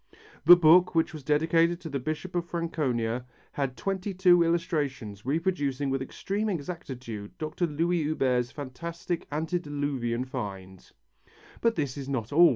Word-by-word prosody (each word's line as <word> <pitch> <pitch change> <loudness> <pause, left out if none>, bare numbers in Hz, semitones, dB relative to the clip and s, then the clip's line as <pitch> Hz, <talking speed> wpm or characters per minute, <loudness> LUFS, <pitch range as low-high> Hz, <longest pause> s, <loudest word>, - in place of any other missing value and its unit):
The 175 +2 +11
book, 175 +1 +5
which 165 0 +2
was 155 - -7
dedicated 165 +4 +2
to 165 - -6
the 140 -2 -2
Bishop 155 +7 -4
of 175 -1 0
Franconia, 130 -9 -1 0.3
had 135 -3 -2
twenty 195 0 -2
two 180 -2 +6
illustrations 145 - -1
reproducing 145 -4 0
with 135 0 0
extreme 200 +10 -2
exactitude 130 - -6
Dr. 155 +3 -2
Louis 165 +3 0
Huber's 130 -5 +1
fantastic 165 +6 -5
antediluvian 145 -6 -2
find. 95 -8 -7 0.7
But 230 -1 +3
this 145 -4 -2
is 135 0 -6
not 125 -2 -2
all. 170 +2 +8
150 Hz, 140 wpm, -28 LUFS, 130-170 Hz, 0.7 s, The